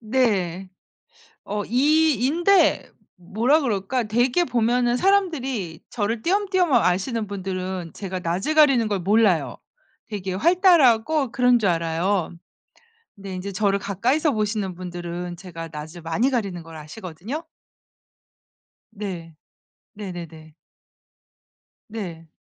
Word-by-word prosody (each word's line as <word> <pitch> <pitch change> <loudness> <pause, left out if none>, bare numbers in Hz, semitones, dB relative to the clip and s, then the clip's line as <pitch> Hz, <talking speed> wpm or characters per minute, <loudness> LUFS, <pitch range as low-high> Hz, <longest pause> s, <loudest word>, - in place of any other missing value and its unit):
네. 200 -7 0 0.8
어 205 +1 -3
E, - - -13 0.4
E 245 -1 0
인데 345 +3 +3 0.3
뭐라 225 - +1
그럴까 235 -1 -1
대개 245 +9 +2
보면은 240 -1 +1
사람들이 270 - 0
저를 220 0 -2
띄엄띄엄 375 -3 +1
아시는 215 +2 +1
분들은 185 -3 -4
제가 190 -2 -5
낯을 180 - -1
가리는 275 -7 +5
걸 200 -2 -1
몰라요. 185 - +2 0.5
되게 195 -5 -4
활달하고 305 - +4
그런 250 -1 +4
줄 205 - +1
알아요. 170 +2 0 0.8
근데 195 -1 -8
인제 190 +2 -5
저를 200 +1 +1
가까이서 250 - 0
보시는 210 -4 -2
분들은 175 0 -6
제가 170 -2 -8
낯을 155 +3 -8
많이 185 +11 +1
가리는 200 -9 -2
걸 165 0 -12
아시거든요. 180 - -7 1.5
네. 175 -6 -7 0.6
네네네. 170 -6 -9 1.4
네. 175 -7 -7
205 Hz, 245 characters per minute, -23 LUFS, 180-250 Hz, 1.5 s, 가리는